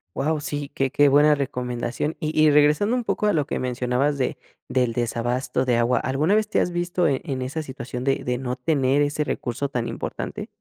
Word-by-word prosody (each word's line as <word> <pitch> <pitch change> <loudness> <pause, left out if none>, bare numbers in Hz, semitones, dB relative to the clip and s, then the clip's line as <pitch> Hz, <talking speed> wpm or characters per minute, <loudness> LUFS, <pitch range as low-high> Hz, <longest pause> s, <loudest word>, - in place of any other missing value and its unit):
Wao, 150 +2 0
sí, 145 -1 -4
que 135 -2 -2
que 145 0 +4
buena 145 +2 +5
recomendación 125 +1 -3
y 155 0 -3
y 155 -1 +6
regresando 150 +11 +4
un 240 - -3
poco 210 - 0
a 210 - +3
lo 150 -3 +1
que - - -2
mencionabas 125 +3 0
de 130 - -1 0.3
del 125 -2 +1
desabasto 120 +2 -1
de 125 -2 +2
agua, 120 +1 +2
¿alguna 145 +9 +1
vez 215 0 +1
te - - +1
has 175 - 0
visto 175 0 0
en 135 -2 0
en 135 -5 -3
esa 140 +5 -3
situación 125 -2 -6
de 135 0 0
de 125 0 0
no 125 0 -4
tener 135 0 +2
ese 145 +1 0
recurso 140 0 -3
tan 120 -3 -2
importante? - - -5
140 Hz, 210 wpm, -23 LUFS, 125-150 Hz, 0.3 s, y